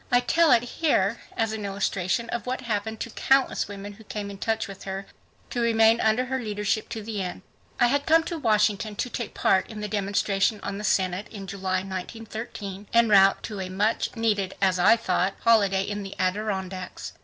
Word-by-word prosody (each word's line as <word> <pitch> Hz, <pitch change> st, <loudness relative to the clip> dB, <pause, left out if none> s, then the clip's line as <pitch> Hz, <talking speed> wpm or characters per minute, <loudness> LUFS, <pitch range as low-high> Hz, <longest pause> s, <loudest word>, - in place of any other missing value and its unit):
I 245 Hz, -, +6 dB
tell 325 Hz, +5 st, +3 dB
it 240 Hz, -1 st, +5 dB
here 240 Hz, -6 st, +1 dB, 0.2 s
as 225 Hz, -1 st, +1 dB
an 220 Hz, -1 st, -4 dB
illustration 195 Hz, +2 st, -1 dB
of 235 Hz, 0 st, -4 dB
what 255 Hz, +1 st, -2 dB
happened 220 Hz, -1 st, -3 dB
to 235 Hz, -, -4 dB
countless 270 Hz, +3 st, +2 dB
women 205 Hz, 0 st, -8 dB
who 220 Hz, +2 st, -15 dB
came 205 Hz, -1 st, -5 dB
in 195 Hz, -, -10 dB
touch 225 Hz, 0 st, -1 dB
with 195 Hz, -1 st, -10 dB
her 195 Hz, 0 st, -4 dB, 0.5 s
to 240 Hz, -, -1 dB
remain 225 Hz, 0 st, +4 dB
under 220 Hz, +4 st, +2 dB
her 265 Hz, +1 st, -2 dB
leadership 210 Hz, -2 st, -2 dB
to 220 Hz, -2 st, -5 dB
the 210 Hz, -2 st, -3 dB
end. 185 Hz, 0 st, -5 dB, 0.4 s
I -, -, +6 dB
had 280 Hz, +3 st, +1 dB
come 325 Hz, +1 st, +5 dB
to 335 Hz, -1 st, -4 dB
Washington 210 Hz, -3 st, +1 dB
to 250 Hz, -, -3 dB
take 235 Hz, -, -5 dB
part 190 Hz, 0 st, +2 dB
in 220 Hz, -2 st, -7 dB
the 210 Hz, -, -3 dB
demonstration 200 Hz, +1 st, 0 dB
on 200 Hz, 0 st, -4 dB
the -, -, -6 dB
Senate 190 Hz, -1 st, 0 dB
in 200 Hz, -3 st, -8 dB
July, 190 Hz, -1 st, -2 dB
1913, 205 Hz, +1 st, -6 dB
en 235 Hz, -1 st, +4 dB
route 195 Hz, -1 st, +5 dB
to 210 Hz, -3 st, -5 dB
a 185 Hz, -1 st, -4 dB
muchneeded, 205 Hz, 0 st, 0 dB
as 190 Hz, -2 st, +2 dB
I 180 Hz, -, +6 dB
thought, 190 Hz, -3 st, 0 dB
holiday 200 Hz, -4 st, +4 dB
in 205 Hz, +1 st, -4 dB
the 195 Hz, -1 st, -7 dB
Adirondacks. 190 Hz, -1 st, -3 dB
210 Hz, 195 wpm, -26 LUFS, 195-230 Hz, 0.5 s, I